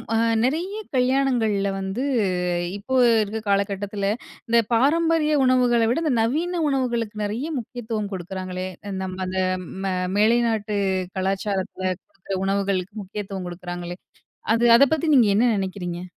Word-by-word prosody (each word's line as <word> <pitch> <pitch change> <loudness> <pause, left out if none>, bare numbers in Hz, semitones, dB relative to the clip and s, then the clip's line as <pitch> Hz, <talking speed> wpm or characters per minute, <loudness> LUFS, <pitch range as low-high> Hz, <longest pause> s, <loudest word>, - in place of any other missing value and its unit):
அ - - +3 0.3
நிறைய 335 - -1 0.2
கல்யாணங்கள்ல 250 -6 +2
வந்து, 195 +7 -3 0.7
இப்போ 260 +6 -3 0.3
இருக்கிற 220 +2 -4
காலகட்டத்தில, 200 0 -1 0.4
இந்த 235 0 +5
பாரம்பரிய 310 +4 +3
உணவுகள 250 -2 +3
விட 300 +7 0
இந்த 300 - +2
நவீன 330 +9 0
உணவுகளுக்கு 235 -5 -1
நெறைய 230 +9 -3
முக்கியத்துவம் 220 -3 -5
கொடுக்குறாங்களே! 185 0 -5 0.2
அ - - -4
நம்ம 185 0 -5
அந்த 185 0 -1 0.4
ம 190 -1 0 0.2
மேலை 225 +3 +4
நாட்டு 210 -2 -1 0.4
கலாச்சாரத்தில 190 0 -2 0.2
குடுக்குற 200 -11 -6
உணவுகளுக்கு 195 -1 -1
முக்கியத்துவம் 195 -1 -6
குடுக்குறாங்களே! 175 0 -6 0.6
அது 230 +1 +2
அத 275 - +6
பத்தி 315 - -3
நீங்க 235 -5 +5
என்ன 245 +2 +4
நெனைக்கிறீங்க? 180 -2 -4
210 Hz, 125 wpm, -23 LUFS, 190-250 Hz, 0.7 s, அத